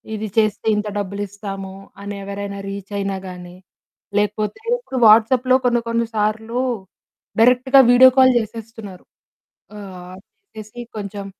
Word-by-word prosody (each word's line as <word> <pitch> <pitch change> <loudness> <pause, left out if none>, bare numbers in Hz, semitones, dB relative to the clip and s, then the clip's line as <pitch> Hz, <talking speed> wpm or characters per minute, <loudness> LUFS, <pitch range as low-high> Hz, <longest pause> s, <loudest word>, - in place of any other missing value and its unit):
ఇది 215 0 -4
చేస్తే 215 -1 +1
ఇంత 210 0 -2
డబ్బులిస్తాము 200 -1 -6 0.3
అని 200 0 -6
ఎవరైనా 200 0 -6
రీచ్ 195 0 -7
అయినా 195 -1 -2
గానీ, 180 0 -10 0.6
లేకపోతే 210 - -1 0.2
ఇప్పుడు 270 - -7
వాట్సాప్‌లో 245 +4 +5
కొన్ని 240 -1 +2
కొన్ని 230 0 0
సార్లు 220 +3 -1 0.8
డైరెక్ట్‌గా 250 +3 +5
వీడియో 255 +1 +8
కాల్ 260 -1 +6
చేసేస్తున్నారు. 220 -3 -9 0.7
ఆహ్, 185 -2 -10 0.4
చేసేసి 215 +2 -9 0.2
కొంచెం 200 -1 -6
210 Hz, 115 wpm, -20 LUFS, 200-230 Hz, 0.8 s, వీడియో